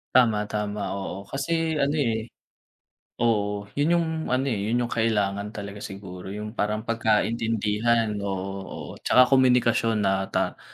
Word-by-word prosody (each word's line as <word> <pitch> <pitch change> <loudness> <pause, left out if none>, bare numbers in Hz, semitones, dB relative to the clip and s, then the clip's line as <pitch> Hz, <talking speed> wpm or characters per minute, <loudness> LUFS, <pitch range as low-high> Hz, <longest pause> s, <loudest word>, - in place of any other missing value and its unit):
Tama, 115 -5 +5
tama. 105 -1 -3
Oo 95 0 -5
kasi 160 +5 -1
ano, 140 +2 +2
eh, 115 -5 0 1.0
oo 105 -3 +1 0.2
yun 165 +4 +3
yung 170 -1 +1 0.2
ano, 130 +1 +1
eh, 105 - -1
yun 120 +2 +1
yung 120 - -4
kailangan 105 -2 0
talaga 100 0 -6
siguro 95 -2 -8
yung 105 0 -5
parang 105 -1 -1
pagkaintindihan, 115 0 +1
oo, 95 -2 -2 0.2
oo. - - -7
Tsaka 125 - +6
komunikasyon 120 -4 +3
na 95 0 +1
ta - - -1
110 Hz, 140 wpm, -25 LUFS, 105-120 Hz, 1.0 s, Tsaka